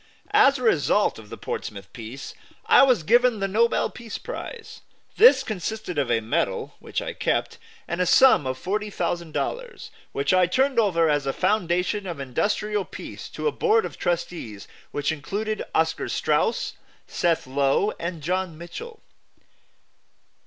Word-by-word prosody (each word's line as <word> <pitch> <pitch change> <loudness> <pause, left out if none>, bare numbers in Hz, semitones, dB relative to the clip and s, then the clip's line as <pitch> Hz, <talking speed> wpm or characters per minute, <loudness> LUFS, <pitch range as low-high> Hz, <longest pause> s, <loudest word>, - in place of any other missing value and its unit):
As 280 -10 +6
a 255 - -6
result 205 - +2
of 105 -2 -13
the - - -8
Portsmouth 100 -2 -6
peace, 120 +4 -8 0.3
I - - +7
was 255 -10 +4
given 240 +4 +4
the 195 - 0
Nobel 230 +4 +2
Peace 230 -3 -7
Prize. - - -8 0.4
This 475 +4 +7
consisted 215 -3 -4
of 135 -4 0
a 115 -1 +2
medal, 110 - -1
which - - -4
I - - -5
kept, - - -1 0.3
and 170 +2 -2
a 180 - +1
sum 255 - +6
of 130 0 -2
$40,000, 210 - -3 0.2
which 140 +5 0
I 185 -1 +4
turned 265 +5 +2
over 170 -7 +3
as 145 -2 +1
a 135 - 0
foundation 185 0 0
of 170 -5 -5
industrial 205 +10 -1
peace - - -9
to - - -6
a - - +2
board 445 0 +2
of - - -8
trustees 165 - -3 0.2
which 145 +1 -1
included 205 +8 -3
Oscar 160 0 +1
Straus, 465 - 0 0.3
Seth 170 -2 0
Low 140 +9 +1
and 170 -3 -5
John 180 0 -2
Mitchell. 445 - -9
185 Hz, 150 wpm, -24 LUFS, 150-225 Hz, 0.4 s, I